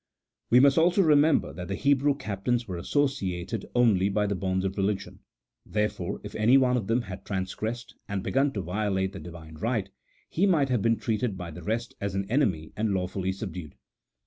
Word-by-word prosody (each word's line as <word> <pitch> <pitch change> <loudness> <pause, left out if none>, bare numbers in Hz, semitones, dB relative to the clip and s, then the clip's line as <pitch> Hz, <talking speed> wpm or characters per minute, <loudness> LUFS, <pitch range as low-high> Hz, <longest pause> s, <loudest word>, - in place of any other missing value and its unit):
We 120 - +7
must 140 +3 +5
also 175 +4 +4
remember 150 -1 +4
that 90 -1 -7
the 95 - -2
Hebrew 140 +2 +2
captains 120 0 -2
were 90 -3 -4
associated 95 -7 -1
only 105 -6 +4
by 105 +1 +1
the 100 - 0
bonds 95 0 -1
of 95 0 -2
religion: 100 0 -2 0.4
therefore, 105 -2 -2
if 105 0 -8
any 115 +5 +5
one 130 -2 +3
of 110 -6 -2
them 115 +2 +1
had 95 -2 -8
transgressed, 110 +4 -4
and 100 -2 -3
begun 135 +1 +1
to 100 - -2
violate 95 +1 -1
the 95 - -7
Divine 80 -3 -10
right, 110 -3 -1 0.4
he 195 +5 +1
might 150 -8 +3
have 125 -4 +1
been 115 +2 +2
treated 110 -2 -1
by 85 -2 -6
the 75 - -9
rest 115 +2 -2
as 100 -1 -2
an 100 0 -1
enemy 95 - +1
and 105 -2 0
lawfully 95 0 -2
subdued. 90 -6 -7
105 Hz, 190 wpm, -27 LUFS, 95-125 Hz, 0.4 s, We